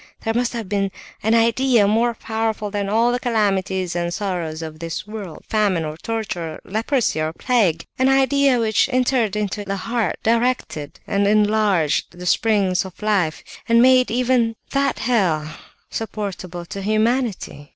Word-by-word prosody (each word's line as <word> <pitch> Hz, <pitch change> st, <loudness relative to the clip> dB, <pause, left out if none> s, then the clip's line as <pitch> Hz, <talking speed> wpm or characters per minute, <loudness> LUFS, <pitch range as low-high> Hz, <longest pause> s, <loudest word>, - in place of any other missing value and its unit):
There 225 Hz, -, -1 dB
must 240 Hz, +1 st, 0 dB
have 230 Hz, -4 st, -4 dB
been 195 Hz, 0 st, 0 dB, 0.3 s
an 220 Hz, +2 st, +2 dB
idea 230 Hz, -1 st, +3 dB
more 230 Hz, +3 st, +2 dB
powerful 220 Hz, -2 st, -2 dB
than 200 Hz, -1 st, -2 dB
all 230 Hz, +3 st, +3 dB
the 245 Hz, -, -1 dB
calamities 195 Hz, -6 st, 0 dB
and 175 Hz, 0 st, -1 dB
sorrows 175 Hz, -5 st, -3 dB
of 155 Hz, -1 st, -8 dB
this 165 Hz, +3 st, -5 dB
world, 210 Hz, -6 st, -8 dB
famine 200 Hz, -7 st, +1 dB
or 155 Hz, 0 st, -5 dB
torture, 180 Hz, -5 st, -4 dB
leprosy 225 Hz, -, 0 dB
or 155 Hz, 0 st, -1 dB
plague—an 245 Hz, +3 st, +1 dB
idea 270 Hz, -1 st, +3 dB
which 220 Hz, +1 st, +2 dB
entered 250 Hz, -4 st, +1 dB
into 210 Hz, 0 st, -2 dB
the 195 Hz, 0 st, -3 dB
heart, 230 Hz, +1 st, -1 dB
directed 230 Hz, -, 0 dB
and 200 Hz, 0 st, +1 dB
enlarged 205 Hz, -7 st, +2 dB
the 180 Hz, -, -8 dB
springs 195 Hz, -1 st, +2 dB
of 190 Hz, -2 st, -11 dB
life, 190 Hz, -7 st, 0 dB, 0.3 s
and 230 Hz, 0 st, +5 dB
made 255 Hz, +1 st, +5 dB
even 240 Hz, -1 st, +1 dB, 0.2 s
that 275 Hz, 0 st, +1 dB
hell 185 Hz, -11 st, +1 dB, 0.4 s
supportable 190 Hz, -5 st, -5 dB
to 195 Hz, +3 st, -6 dB
humanity! 215 Hz, -, -1 dB
215 Hz, 150 wpm, -21 LUFS, 185-235 Hz, 0.4 s, and